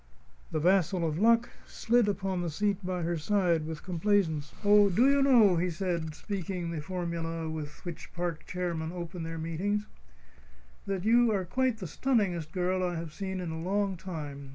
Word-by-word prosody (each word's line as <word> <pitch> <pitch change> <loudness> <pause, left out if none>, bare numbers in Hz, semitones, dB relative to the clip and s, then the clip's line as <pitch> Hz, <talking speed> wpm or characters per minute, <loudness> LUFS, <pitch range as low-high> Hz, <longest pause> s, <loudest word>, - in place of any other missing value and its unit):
The 155 - -1
vassal 175 0 +2
of 155 +1 -2
Luck 230 +2 +4 0.2
slid 235 -1 +2
upon 195 -2 -1
the 175 - -2
seat 205 +4 -1
by 180 -1 -2
her 170 +1 -1
side 170 -3 +1
with 160 -1 -6
complaisance. 170 -5 0
"Do 205 0 +6
you 275 +5 +5
know," 230 -9 +6
he 180 +2 +1
said, 170 -3 -2
speaking 185 -3 -4
the 160 -3 -3
formula 165 -1 -3
with 155 +1 -6
which 175 -3 -7
park 175 -2 -4
chairmen 170 -3 -3
open 175 0 -6
their 165 0 -5
meetings, 185 +6 -1 1.0
"that 195 -1 -2
you 235 +1 +5
are 195 -3 0
quite 255 +4 0
the 195 - -6
stunningest 180 - 0
girl 185 +1 0
I 175 -1 -1
have 165 -2 -5
seen 190 +1 -4
in 175 -3 -4
a 160 0 -5
long 195 +2 0
time? 150 -6 -7
180 Hz, 175 wpm, -30 LUFS, 165-200 Hz, 1.0 s, Do